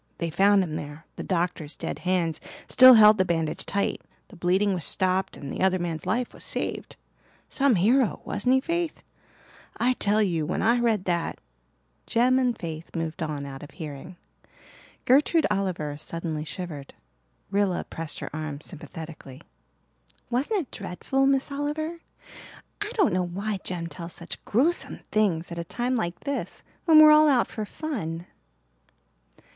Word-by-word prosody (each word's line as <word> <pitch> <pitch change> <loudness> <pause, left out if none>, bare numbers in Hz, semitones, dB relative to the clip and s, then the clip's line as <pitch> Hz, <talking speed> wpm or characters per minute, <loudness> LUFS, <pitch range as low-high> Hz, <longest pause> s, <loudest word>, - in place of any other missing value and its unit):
They 170 -1 -3
found 195 +3 +4
them 155 -3 -4
there, 150 +2 -8
the - - -6
doctor's 170 -4 -2
dead - - -5
hands 175 -4 0 0.3
still 255 -1 +9
held 215 -1 +7
the - - +5
bandage 165 -3 -2
tight, 200 0 -1 0.3
the - - -14
bleeding 190 +4 +2
was 175 -3 -3
stopped 190 +1 +1
and 140 - -7
the - - -4
other 190 0 +3
man's 170 -3 -4
life 245 +2 -1
was - - -7
saved. - - -3 0.5
Some 275 -4 +3
hero, 230 +7 +3
wasn't 250 +5 +1
he, 265 - +3
Faith? 335 +2 -2 0.7
I 250 +1 +2
tell 210 -3 +1
you 170 -5 0
when 155 - -2
I 235 +2 +4
read 225 -5 +1
that 170 -2 -1 0.4
" - - -43
Jem 250 +3 +3
and 250 -2 +1
Faith 165 -1 -7
moved 165 0 -3
on 150 -3 -3
out 135 -1 -8
of 145 - -10
hearing. 160 +2 -8 0.9
Gertrude 295 +5 +4
Oliver 185 -7 -1
suddenly 160 -1 -5
shivered. 155 -5 -7 0.6
Rilla 200 -2 +1
pressed 165 -2 -5
her - - -6
arm 155 -2 -4
sympathetically. 155 -4 -9 0.9
"Wasn't 290 - +1
it 280 - -11
dreadful, 265 +8 -1
Miss 275 +1 +1
Oliver? 305 +4 -3 0.8
I 415 - -2
don't 390 - +3
know 180 -1 0
why 200 +3 -3
Jem 175 -2 -3
tells 170 0 -8
such 170 - -7
gruesome 295 +11 +1
things 180 -6 +1
at 170 - -5
a - - -2
time 245 +9 -2
like 175 -7 -3
this 280 -1 -4 0.2
when 320 -3 +7
we're 305 0 +9
all 305 0 +7
out 255 -4 +4
for 215 - -5
fun." 195 - -5
185 Hz, 160 wpm, -26 LUFS, 165-250 Hz, 0.9 s, still